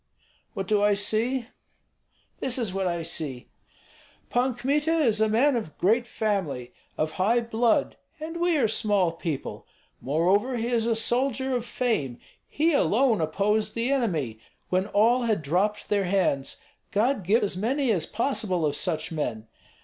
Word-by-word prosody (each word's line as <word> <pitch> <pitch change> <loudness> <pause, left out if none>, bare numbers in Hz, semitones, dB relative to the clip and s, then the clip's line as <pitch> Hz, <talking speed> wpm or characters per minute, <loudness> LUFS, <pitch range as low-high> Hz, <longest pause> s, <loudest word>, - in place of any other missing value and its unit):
"What 195 -1 -3
do 210 0 +2
I 205 0 +4
see? 225 +5 +1 0.9
This 260 0 0
is 225 -7 -2
what 190 -1 -1
I 170 -1 -2
see: 150 -6 -3 0.8
Pan 250 0 +1
Kmita 290 +6 0
is 245 -10 +2
a 220 - +3
man 255 +6 +3
of 215 -10 -4
great 230 +5 +2
family, 180 - -2 0.2
of 155 0 0
high 230 +5 +3
blood, 230 0 +1 0.2
and 320 +2 -6
we 345 -1 +2
are 245 -6 +3
small 205 -5 +1
people. 165 -4 -5 0.3
Moreover 190 - +1
he 230 +1 -2
is 230 -2 +1
a 230 - +2
soldier 260 +3 +1
of 245 -1 -3
fame; 150 - -1 0.3
he 320 +3 +1
alone 245 - +3
opposed 210 +6 0
the 235 +3 0
enemy 160 - -1 0.3
when 185 +2 +1
all 230 +5 +3
had 215 -8 0
dropped 185 +8 0
their 205 -2 +1
hands, 175 -8 0 0.3
God 235 +4 +1
give 210 +7 +2
as 200 - -1
many 250 +6 0
as 175 -7 0
possible 210 - -1
of 145 -1 0
such 165 -3 -2
men! 120 -9 -3
215 Hz, 155 wpm, -26 LUFS, 180-245 Hz, 0.9 s, I